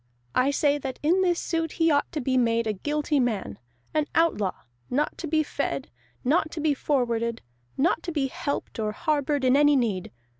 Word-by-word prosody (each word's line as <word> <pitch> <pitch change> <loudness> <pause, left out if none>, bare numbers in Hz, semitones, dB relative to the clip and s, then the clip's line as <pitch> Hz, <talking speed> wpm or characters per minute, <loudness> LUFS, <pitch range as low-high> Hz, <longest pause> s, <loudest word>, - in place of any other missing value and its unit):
I 255 +2 +3
say 290 0 +2
that 265 -2 -5
in 350 +5 +3
this 355 -2 +2
suit 325 -2 -2
he 330 -1 +3
ought 285 -1 +1
to 320 - -3
be 260 +1 0
made 230 -2 +2
a 215 - 0
guilty 295 +7 0
man, 205 - -1 0.3
an 305 -1 +1
outlaw, 215 - +1 0.3
not 295 +4 0
to 335 - -4
be 310 0 +2
fed, 140 - -3 0.3
not 310 +4 +2
to 330 - -4
be 305 -1 +2
forwarded, 235 -5 -1 0.3
not 320 +3 +2
to 340 - -4
be 295 -4 0
helped 275 -2 -4
or 215 -1 -1
harbored 290 +1 0
in 255 +1 +5
any 290 0 +5
need. 215 -8 0
285 Hz, 190 wpm, -26 LUFS, 240-310 Hz, 0.3 s, in